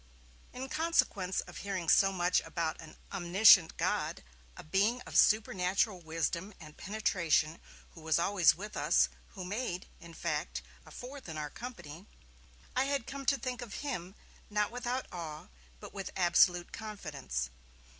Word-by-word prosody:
In 260 +1 -6
consequence 260 - +1
of - - -11
hearing 190 -4 -3
so 195 +4 +5
much 180 -1 +2
about 165 -2 -3
an 160 - -12 0.2
Omniscient 185 -1 +6
God, - - -1 0.3
a - - -8
being 200 +10 +2
of - - -10
supernatural 195 -2 +3
wisdom 170 +4 -2
and 155 -3 -12
penetration 170 -6 0 0.3
who 165 - -14
was 160 0 +2
always 175 0 +4
with 210 +4 -8
us, - - +3 0.3
who 185 -3 -6
made, 195 -2 -3
in 170 -1 -12
fact, 150 - -3 0.2
a - - -11
fourth 260 -4 -9
in 160 - -5
our 150 -1 -4
company, 195 -8 -9 0.7
I 260 - +3
had 275 -4 -1
come 275 +1 -7
to 275 - +4
think 250 -1 -4
of 235 -5 -7
Him, 190 -9 -4 0.3
not 210 0 0
without 245 +1 -2
awe, 160 -4 -7 0.3
but - - -10
with 195 -1 -5
absolute 175 -1 +4
confidence. 140 - -4
190 Hz, 150 wpm, -32 LUFS, 170-220 Hz, 0.7 s, Omniscient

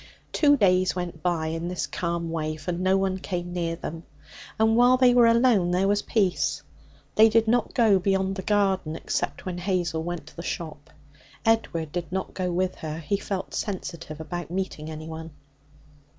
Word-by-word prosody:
Two 290 -2 +4
days 185 -4 +3
went 175 -3 -5
by 170 -3 0
in 165 +1 -3
this 180 0 -2
calm 170 -1 -3
way, 155 -1 -2
for 160 +3 -4
no 185 +2 +2
one 190 -1 0
came 175 -1 -4
near 170 -2 -1
them, 165 0 -6 0.6
and 220 0 +3
while 245 +2 +6
they 250 -1 +5
were 240 -1 +6
alone 230 -6 +4
there 180 +2 +2
was 205 0 +2
peace. 195 -6 0 0.5
They 220 +1 +7
did 225 0 +3
not 235 0 +1
go 215 -5 +5
beyond 190 0 0
the 190 - -4
garden, 190 -5 +1
except - - -3
when 180 -1 -4
Hazel 175 -3 -1
went 175 -2 -5
to 160 - -15
the 170 - -6
shop. 155 -3 -6 0.6
Edward 170 -9 +1
did 175 -1 -4
not 190 0 -3
go 180 -1 -2
with 185 +1 0
her; 155 -1 -5
he 165 +5 -1
felt 195 -1 -4
sensitive 170 -6 -5
about 175 +2 -5
meeting 175 -4 -4
anyone. 160 +1 -7
180 Hz, 180 wpm, -26 LUFS, 165-200 Hz, 0.6 s, They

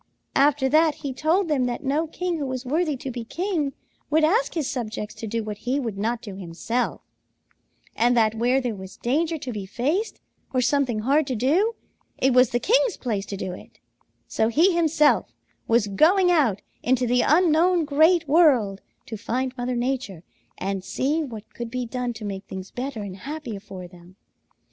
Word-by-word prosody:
"After 280 -1 +4
that, 310 +2 +4
he 270 - -2
told 330 +8 +1
them 285 -5 +1
that 245 +4 -3
no 295 +4 0
king 350 +1 -3
who 280 - -2
was 260 0 -4
worthy 305 +2 0
to 260 +1 -5
be 240 -1 -5
king 325 - -2 0.4
would 310 +1 +3
ask 430 +10 +2
his 310 -5 -1
subjects 215 -5 -4
to 225 - -7
do 230 +1 -2
what 210 -1 -6
he 255 +3 -1
would 230 -7 -3
not 225 +4 -2
do 205 -5 -7
himself, 190 +7 -3 0.9
and 240 +1 +3
that 220 -2 +4
where 245 +4 +2
there 245 -3 -2
was 190 -1 -10
danger 320 +7 0
to 260 -4 -6
be 200 -3 -5
faced 300 - -1 0.4
or - - +4
something 250 -4 +1
hard 280 +5 +2
to 260 - -1
do, 335 - +2 0.4
it 265 0 +2
was 250 -1 +5
the 240 - 0
king's 470 - +2
place 210 -5 -3
to 200 - -5
do 185 - -4
it, - - -13 0.5
so 220 - +1
he 330 +11 +4
himself 315 -3 +2 0.3
was 230 -1 +3
going 355 - +4
out 265 - +2 0.2
into 255 0 +2
the 245 +1 +3
unknown 335 +2 +3
Great 315 +3 +4
World 265 - +4 0.2
to 220 - -6
find 255 +4 -2
Mother 250 0 -2
Nature 240 -8 -2 0.3
and 195 0 -3
see 290 +10 0
what 225 -7 -9
could 235 -1 -6
be 250 +1 -3
done 250 +1 -3
to 220 -2 -8
make 195 -1 -5
things 190 0 -8
better 250 -3 -4
and 190 -2 -7
happier 275 -4 -6
for 185 -2 -9
them. 175 +1 -17
255 Hz, 185 wpm, -24 LUFS, 220-310 Hz, 0.9 s, was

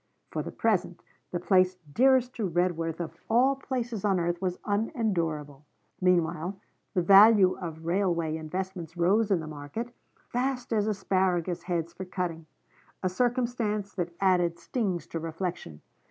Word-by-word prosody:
For - - -2
the - - -6
present 195 -6 0 0.3
the 175 - -2
place 185 0 +3 0.2
dearest 255 - +4
to 210 -5 -1
Redworth 165 -1 0
of 170 -2 -5
all 255 +4 +4
places 245 -6 -4
on 195 -3 +2
earth 175 +1 -1
was 180 -1 -1
unendurable. 170 - -1 0.4
Meanwhile 180 +1 +1 0.4
the 180 - +2
value 200 0 +7
of 165 -3 -7
railway 170 -3 0
investments 170 +1 -5
rose 200 +6 +3
in 190 -5 +2
the - - -6
market, 155 +11 -6 0.2
fast 250 -1 -3
as 210 -1 +1
asparagus 185 -4 0
heads 170 -2 -2
for 190 +2 -7
cutting: 175 -3 -4 0.6
a 185 - +2
circumstance 230 -2 -1
that 175 -2 -3
added 180 -3 +2
stings 190 -2 -2
to 165 - -5
reflection. 165 - -5
185 Hz, 140 wpm, -28 LUFS, 170-215 Hz, 0.6 s, value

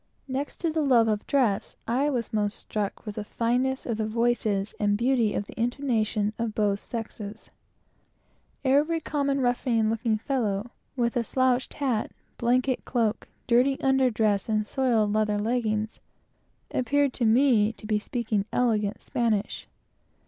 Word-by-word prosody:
Next 270 +2 -3
to 335 -2 +1
the 315 0 0
love 245 -6 +4
of 210 -1 -1
dress, 240 -8 +1
I 265 +5 +1
was 240 -6 -2
most 210 -1 0
struck 210 0 -4
with 210 - -5
the 215 - -2
fineness 250 +5 -1
of 230 -3 -2
the 220 -1 -1
voices 220 -3 0
and 205 -1 +2
beauty 235 -2 +2
of 205 - -1
the - - -11
intonations 230 -4 0
of 225 -2 -2
both 205 -2 +1
sexes. 215 -2 -7 1.1
Every 295 +5 +3
common 280 -3 -1
ruffian 240 -3 +1
looking 225 -1 0
fellow, 220 -3 -2 0.2
with 235 -2 0
a 240 - +1
slouched 255 +1 +1
hat, 255 -7 -1 0.3
blanket 250 +2 +1
cloak, 225 -3 -1 0.2
dirty 250 +3 +3
under 265 -1 +3
dress, 215 -3 0
and 215 -1 +1
soiled 225 -4 +1
leather 215 -1 +1
leggins, 220 -1 -1 0.7
appeared 280 +1 +1
to 240 - -1
me 225 -2 +4
to 215 - -13
be 215 -1 +1
speaking 215 -3 -2
elegant 215 -4 +1
Spanish. 220 -4 -1
230 Hz, 150 wpm, -26 LUFS, 215-260 Hz, 1.1 s, love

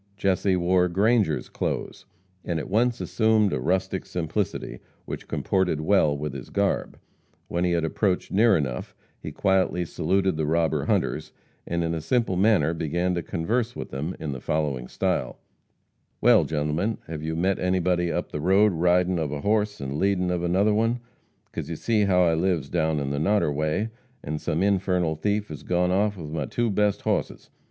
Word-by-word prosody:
Jesse 95 0 +1
wore 90 0 +2
Grangers' 100 -2 +2
clothes, - - -4 0.4
and 85 - -2
at 80 - -5
once 120 +3 +2
assumed 110 -3 +2
a - - 0
rustic 95 +1 -1
simplicity 90 +3 -3 0.3
which - - -7
comported 95 -5 0
well 80 -3 +3
with 75 -1 -4
his 70 -3 -8
garb. 100 0 -1 0.5
When 85 +1 0
he 90 - +1
had 85 -1 +1
approached 90 +3 -1
near 105 0 +4
enough 65 -5 -4 0.2
he - - -7
quietly 95 -2 +1
saluted 95 0 0
the 80 -1 -1
robber 80 +1 +1
hunters, 80 0 -1 0.4
and 85 0 -1
in 85 0 -1
a 80 - -3
simple 95 +4 0
manner 95 -5 +3
began 85 +3 -1
to 85 - -1
converse 115 +10 -2
with - - -7
them 75 +7 -4
in 80 -3 -4
the 65 -2 -6
following 70 -5 -1
style: - - -1 0.8
"Well, - - +5
gentlemen, 80 +8 -1
hev 80 -1 -6
you 80 +1 -3
met 95 +3 +1
anybody 90 -1 +1
up 85 -1 -3
the 75 - -4
road 95 +4 +4
ridin' 90 +1 +2
of 75 -3 -2
a 75 -1 -4
hoss 105 +1 0
an' 70 +2 -4
leadin 95 -2 +1
ov 90 -1 -1
another 95 +5 +2
one, 115 +3 +1 0.5
'cause - - -5
you - - -3
see 110 -2 +1
as 100 - +2
how 90 -2 +4
I 85 -2 +3
lives 80 -4 0
down 80 -3 0
on 70 -1 -2
the 70 - -1
Noderway, 80 +2 +1 0.3
an' 75 +1 -3
some 80 +5 -1
infernal 90 -4 +1
thief 105 +6 -1
has 75 -2 -7
gone 90 0 +1
off 100 +2 +1
with 75 -4 -7
my 75 -3 -2
best 105 - 0
two - - -25
hosses. - - -3
90 Hz, 180 wpm, -25 LUFS, 80-100 Hz, 0.8 s, Well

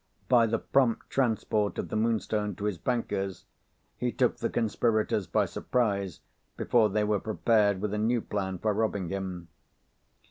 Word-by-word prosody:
By 120 -2 +5
the 115 +1 +1
prompt 125 -1 +1
transport 110 -5 0
of - - -3
the - - -4
Moonstone 110 -2 0
to 100 - -8
his 100 -5 -2
banker's, 100 -6 -2 0.5
he - - -1
took - - +1
the - - -1
conspirators 110 -3 0
by - - +2
surprise 100 - -1 0.4
before 115 -3 +3
they 105 +1 +1
were 105 -1 +1
prepared 105 -2 +2
with 105 -1 -2
a 105 - -1
new 115 +2 +1
plan 95 -3 -3
for 105 +4 0
robbing 100 -4 -1
him. 95 -3 -4
105 Hz, 155 wpm, -28 LUFS, 100-115 Hz, 0.5 s, By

